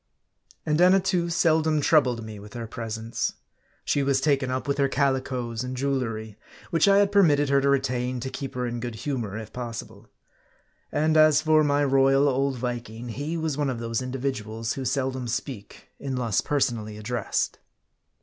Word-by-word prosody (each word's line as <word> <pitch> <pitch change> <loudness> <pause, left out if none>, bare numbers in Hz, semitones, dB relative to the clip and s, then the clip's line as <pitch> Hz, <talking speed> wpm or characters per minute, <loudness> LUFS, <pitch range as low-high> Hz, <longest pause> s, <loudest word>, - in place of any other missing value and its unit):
And 155 +2 +1
Annatoo 180 -1 +4
seldom 160 -2 +2
troubled 130 -6 +3
me 110 -2 -8
with 105 0 -12
her 120 -1 -4
presence. 115 0 -4 0.5
She 145 - +1
was 140 -1 +2
taken 140 -3 +1
up 130 +2 -3
with 140 0 -1
her 140 -1 +3
calicoes 130 -4 -1
and 130 0 -5
jewelry; 115 -6 -2 0.3
which 165 +3 +3
I 200 0 +6
had 200 0 +4
permitted 150 -8 +4
her 140 0 +4
to 140 - +2
retain, 125 -2 0
to 130 +1 -4
keep 135 -2 -6
her 125 0 -1
in 120 0 -3
good 120 -1 -5
humor 110 -4 -3
if 110 -1 -8
possible. 115 -3 -7 0.8
And 155 +2 +1
as 155 -1 +6
for 155 -1 +4
my 145 0 +2
royal 135 +1 +4
old 135 0 +1
Viking, 120 -1 -5
he 145 +8 -3
was 155 -3 -2
one 145 -2 +1
of 130 - -2
those 115 +1 -2
individuals 120 -4 -3
who 135 - -5
seldom 130 -1 -1
speak, 120 -3 -6
unless 125 -6 -1
personally 115 -7 -1
addressed. 110 0 -2
130 Hz, 170 wpm, -26 LUFS, 115-145 Hz, 0.8 s, I